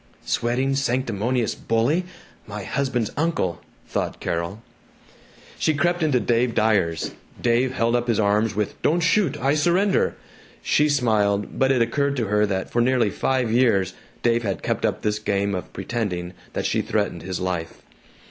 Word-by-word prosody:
"Sweating 130 +3 0
sanctimonious 125 -3 0
bully 125 +11 0 0.4
my 105 -1 -6
husband's 125 -2 -1
uncle!" 150 - -1 0.2
thought - - -3
Carol. 85 +6 -3 1.0
She 155 - +2
crept 175 +3 +1
into 150 -5 +3
Dave 120 0 +1
Dyer's. 100 -7 +1 0.3
Dave 125 +2 +2
held 115 -1 +1
up 120 0 0
his 115 -3 +1
arms 105 0 +2
with, 105 0 -2
"Don't 170 +3 +2
shoot! 165 -3 +2
I 135 +2 +2
surrender!" 175 +6 +2 0.5
She 150 +1 +3
smiled, 105 -7 +1
but 135 0 +4
it 125 -3 +4
occurred 140 +4 0
to 115 - 0
her 105 0 +3
that 95 -1 -2
for 120 - +2
nearly 120 -4 +2
five 130 -4 0
years 105 -6 +3 0.3
Dave 120 0 +3
had 100 -4 -3
kept - - 0
up - - -3
this 105 0 0
game 100 -1 0
of 90 - -5
pretending 90 -7 -3 0.2
that - - -2
she - - +1
threatened - - -1
his 95 -1 -4
life. 90 -3 -4
115 Hz, 155 wpm, -23 LUFS, 100-135 Hz, 1.0 s, but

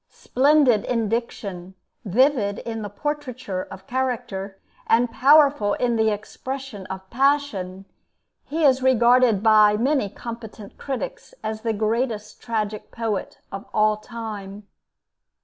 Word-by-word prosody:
Splendid 270 -5 +3
in 230 -4 0
diction, 195 -5 -4 0.3
vivid 220 0 +2
in 225 -1 -5
the 205 - -5
portraiture 255 -6 -4
of 190 - -11
character, 240 -7 -3 0.3
and 235 +1 +3
powerful 275 -5 +5
in 240 -1 0
the 220 -1 +3
expression 220 0 -6
of 190 0 -7
passion, 235 -9 0 0.6
he 320 +2 -3
is 265 -1 +4
regarded 245 -4 +4
by 215 -1 +6
many 260 -2 +1
competent 225 -2 -9
critics - - -5
as 220 0 -4
the 230 0 -1
greatest 220 0 -2
tragic 215 -3 -3
poet 225 -3 -4
of 195 0 -6
all 215 0 +4
time. 210 -3 -8
225 Hz, 120 wpm, -23 LUFS, 205-260 Hz, 0.6 s, by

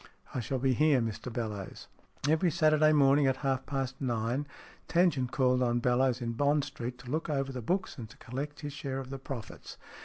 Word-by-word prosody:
" - - -23
I - - -1
shall 130 +3 -2
be 130 +1 +2
here, 150 +1 +4
Mr 115 +1 -3
Bellowes." 105 -5 -5 0.4
Every 160 +3 +3
Saturday 155 -1 +4
morning 140 -1 +5
at 130 - +2
half 135 -1 0
past 135 -1 -3
nine 120 +2 -1 0.4
Tan 175 +1 +4
gent 130 -3 -3
called 130 -1 +2
on 120 -1 +2
Bellowes 125 +1 +2
in 115 - -1
Bond 145 +4 +2
Street, 125 -1 -6
to 125 -1 -9
look 160 +2 -1
over 135 -2 -1
the 130 -1 -5
books 180 - -2
and 110 -2 -7
to - - -15
collect 145 +5 -6
his 145 -2 -5
share 135 -2 -4
of 135 0 -6
the 135 - -5
profits. 130 -4 -8
135 Hz, 210 wpm, -30 LUFS, 125-145 Hz, 0.4 s, morning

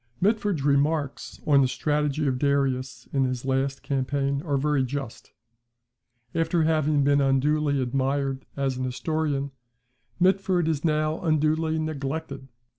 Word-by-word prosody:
[Mitford's 205 -6 +1
remarks 145 0 0
on 140 -2 +5
the 130 - +3
strategy 150 +2 0
of 130 -2 0
Darius 130 -3 0
in 135 -2 +2
his 130 0 -3
last 135 +1 -1
campaign 140 +1 -1
are 145 -4 -1
very 145 -1 +1
just. 135 -2 -6 1.0
After 165 0 +1
having 155 -2 +2
been 140 0 +3
unduly 140 +2 +2
admired 135 +1 -1
as 135 -2 -1
an 130 - -3
historian, 140 +1 -2 0.7
Mitford 185 -2 +2
is 155 -3 -1
now 155 -1 +1
unduly 155 -1 +1
neglected. 140 -2 -4
140 Hz, 125 wpm, -25 LUFS, 135-155 Hz, 1.0 s, on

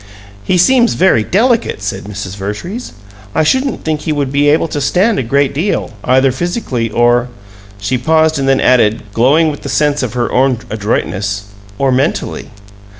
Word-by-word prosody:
"He 180 - +1
seems 240 +6 +3
very 180 -12 +3
delicate," 225 - +1
said 100 - -4
Mrs. 100 -2 -6
Vertrees. 105 - -6 0.4
"I 160 - +3
shouldn't 260 - 0
think 155 -1 -2
he 160 - -2
would 145 -3 -1
be 145 +1 +2
able 155 +2 +2
to 145 - -3
stand 195 - +1
a - - +1
great 135 +3 +1
deal, 160 -1 -1
either 130 +1 +3
physically 130 - -2
or 120 +2 +2 0.3
" 100 0 -22
She 105 +6 -2
paused 160 +2 +2
and 135 - -1
then 135 - +3
added, 115 -4 +3
glowing 150 +8 +3
with 145 - -9
the 140 - -6
sense 145 +1 +1
of 125 -4 -3
her 120 -1 -1
own 130 -1 +2
adroitness 100 -2 -2 0.3
"or 135 +2 +1
mentally." 135 +5 -1
135 Hz, 175 wpm, -14 LUFS, 115-160 Hz, 0.4 s, seems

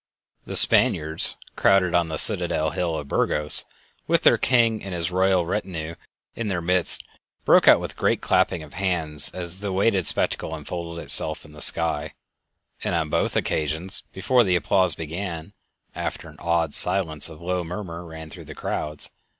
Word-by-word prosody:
The - - -5
Spaniards, 80 +1 +4 0.2
crowded 95 -3 +2
on 85 -1 +1
the 80 -1 -5
citadel 80 +2 +3
hill 85 -3 -3
of 75 -2 -6
Burgos, 75 +1 0 0.4
with - - +1
their - - +4
king 115 -3 +1
and 95 -2 -6
his 85 +1 -2
royal 95 -1 +1
retinue 85 -4 -5 0.4
in 115 - -4
their 95 -4 -2
midst, 90 +1 +5 0.4
broke - - +4
out - - +7
with - - -6
a - - -18
great - - +1
clapping 80 - 0
of 75 - -15
hands 85 -6 -1
as 90 0 -7
the 100 - -5
awaited 95 -2 0
spectacle 80 - -1
unfolded 85 +2 -7
itself 80 0 +3
in 75 - -16
the 75 - -10
sky; 80 -2 0 0.7
and 90 - -2
on 80 -2 -2
both - - -1
occasions, 80 +6 -1
before 120 +6 +1
the 95 -4 +1
applause 90 -2 +1
began, 80 +1 -7 0.4
after - - -6
an - - -15
awed 85 -3 -1
silence 80 -6 +3
a 80 - -11
low 90 +3 -4
murmur 85 0 -7
ran 80 -2 -11
through - - -11
the - - -11
crowds. 75 0 -3
85 Hz, 170 wpm, -23 LUFS, 80-95 Hz, 0.7 s, out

